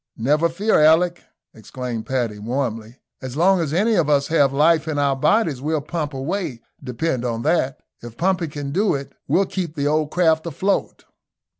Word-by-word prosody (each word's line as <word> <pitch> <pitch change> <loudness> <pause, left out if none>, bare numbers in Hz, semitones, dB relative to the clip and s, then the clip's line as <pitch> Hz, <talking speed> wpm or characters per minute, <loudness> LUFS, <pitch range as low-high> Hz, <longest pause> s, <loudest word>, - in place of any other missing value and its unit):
"Never 150 +8 +2
fear, 200 +5 +1
Alick," 170 +3 +4 0.3
exclaimed 115 0 -6
Paddy, 120 -5 -2
warmly. 115 0 -3 0.2
"As 130 0 -6
long 190 +3 +4
as 160 -4 -2
any 205 +8 +2
of 170 -7 +2
us 140 -1 +2
have 145 -4 +3
life 155 +3 +3
in 155 -2 -2
our 140 -1 +2
bodies, 155 - +1
we'll 155 +2 0
pump 150 -1 -4
away, 150 - -3 0.2
depend 125 +1 -2
on 115 -2 -2
that. 145 -4 0 0.2
If 120 -1 -10
pumping 180 -2 0
can 145 -1 -6
do 200 +4 +1
it, 140 0 -7
we'll 195 - +2
keep 180 -4 -4
the 140 -2 -2
old 150 0 +1
craft 160 -1 +2
afloat." 190 +5 -2
150 Hz, 175 wpm, -21 LUFS, 130-170 Hz, 0.3 s, Alick